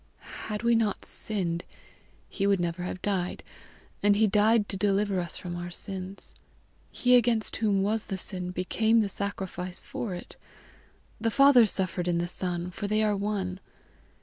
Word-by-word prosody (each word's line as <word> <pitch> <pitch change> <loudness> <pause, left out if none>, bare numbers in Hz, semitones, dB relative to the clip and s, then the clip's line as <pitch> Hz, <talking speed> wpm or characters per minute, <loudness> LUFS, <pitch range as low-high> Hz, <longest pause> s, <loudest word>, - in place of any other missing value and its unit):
"Had 210 +1 -4
we 235 0 +4
not 225 -3 +1
sinned 180 -5 -3 0.6
he 200 -1 -1
would 200 -2 +3
never 175 0 -2
have 180 0 -5
died; 185 -3 -1 0.6
and 205 0 +4
he 220 +2 +4
died 210 +1 +3
to - - -3
deliver 200 0 +1
us 175 -3 -3
from 175 -1 -5
our 175 0 -5
sins. 190 +1 -6 0.6
He 250 0 +3
against 230 -2 +3
whom 205 -3 +2
was 215 +2 0
the 195 - -4
sin, 180 -1 -5
became 220 +5 +2
the 205 - -1
sacrifice 190 -2 -4
for 205 -7 -5
it; 175 - -10 0.8
the 230 - +1
Father 265 -1 +6
suffered 185 -2 +1
in 175 -1 +1
the 170 0 -1
Son, 180 0 -3
for 200 +2 -4
they 215 +1 +2
are 210 -1 +2
one. 195 -2 -2
200 Hz, 165 wpm, -28 LUFS, 180-215 Hz, 0.8 s, Father